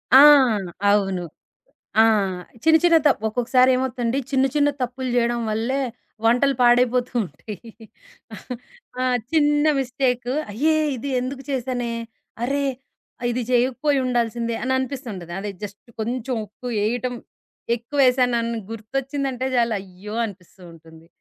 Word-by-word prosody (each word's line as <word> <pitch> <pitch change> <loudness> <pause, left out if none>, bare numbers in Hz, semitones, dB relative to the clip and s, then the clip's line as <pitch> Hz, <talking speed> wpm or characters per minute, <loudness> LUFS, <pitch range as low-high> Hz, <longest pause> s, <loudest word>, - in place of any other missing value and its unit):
ఆ! - - +11 0.7
అవును. 195 -3 +1 0.8
ఆ! - - +9 0.6
చిన్న, 320 0 +6
చిన్న 335 -1 +6
తప్ 265 -6 +3
ఒక్కొక్కసారేమవుతంది. 255 +1 +2
చిన్న, 265 -1 +3
చిన్న 290 0 +4
తప్పులు 250 +1 -3
జేయడం 240 0 +1
వల్లే 235 +6 -1 0.4
వంటలు 250 +4 +3
పాడైపోతూ 245 +1 +3
ఉంటాయి. 190 +5 -8 1.4
ఆ! - - +1 0.3
చిన్న 295 -1 +3 0.2
మిస్టేకు, 250 -1 -1 0.2
అయ్యే! 310 +8 +2 0.2
ఇది 275 +4 -5
ఇందుకు 265 +1 -5
చేశానే, 245 -2 -2 0.5
అర్రె! 280 +2 0 0.6
ఇది 245 +1 -1
చెయ్యకపోయుండాల్సిందే 245 -3 +1
అననిపిస్తుంటది. 255 - -3
అదే 205 - -4
జస్ట్ 205 +5 -10
కొంచెం 245 +3 -2
ఉప్పేపేయటం 240 +2 -2 0.6
ఎక్కువేశానన్న, 245 -2 +2 0.2
గుర్తొచ్చిందంటే 265 +3 -3
జాలు 235 -2 +2
అయ్యో! 195 +3 -10
అనిపిస్తూ 185 -2 -13
ఉంటుంది. 160 0 -16
245 Hz, 100 wpm, -22 LUFS, 225-265 Hz, 1.4 s, ఆ